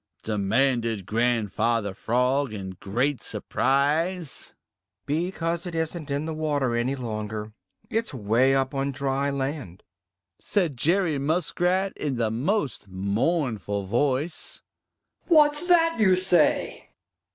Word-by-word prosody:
demanded 115 0 +1
Grandfather 115 -1 0
Frog 125 +5 +1
in 95 -3 -5
great 125 +8 -1
surprise. 150 +5 -1 0.5
"Because 170 +2 -1
it 175 - -5
isn't 160 -1 -3
in 140 +2 -1
the 160 - -3
water 145 -5 0
any 120 +4 0
longer; 110 -3 -5 0.3
it's 225 +1 -1
way 125 +3 +2
up 135 +1 0
on 140 0 -1
dry 140 0 -1
land," 135 - -4 0.6
said 175 -9 0
Jerry 165 +3 +1
Muskrat 175 +5 0
in 145 -3 -2
the 115 -2 0
most 140 - -1
mournful 100 - -1
voice. 135 - -1 0.6
"What's 300 0 +4
that 330 -5 +4
you 190 -4 +5
say?" 180 -4 +1
140 Hz, 110 wpm, -25 LUFS, 115-165 Hz, 0.6 s, you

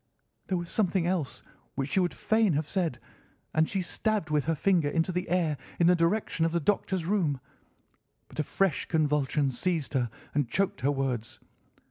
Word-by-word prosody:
There 185 - 0
was 175 -1 -5
something 190 -4 +1
else 175 -6 -2 0.3
which 135 +1 -2
she 190 - +3
would 180 -1 +2
fain 220 -4 +2
have 150 +1 0
said, 165 -10 -1 0.5
and 160 0 +3
she 195 -2 -1
stabbed 210 -2 -1
with 150 -2 +2
her 165 - +1
finger 170 -2 +2
into 165 +4 +1
the 180 0 -2
air 165 -5 +1 0.2
in 170 - +5
the 180 +1 +6
direction 170 0 +1
of 165 - +2
the 170 - +2
Doctor's 185 0 0
room, 170 -8 +1 0.9
but - - -11
a - - +3
fresh 190 +1 0
convulsion 150 -3 +1
seized 160 +3 -1
her 125 -4 +1 0.2
and 145 -5 +1
choked 190 -6 0
her 140 +3 +2
words. 130 -5 -2
165 Hz, 180 wpm, -29 LUFS, 145-185 Hz, 0.9 s, the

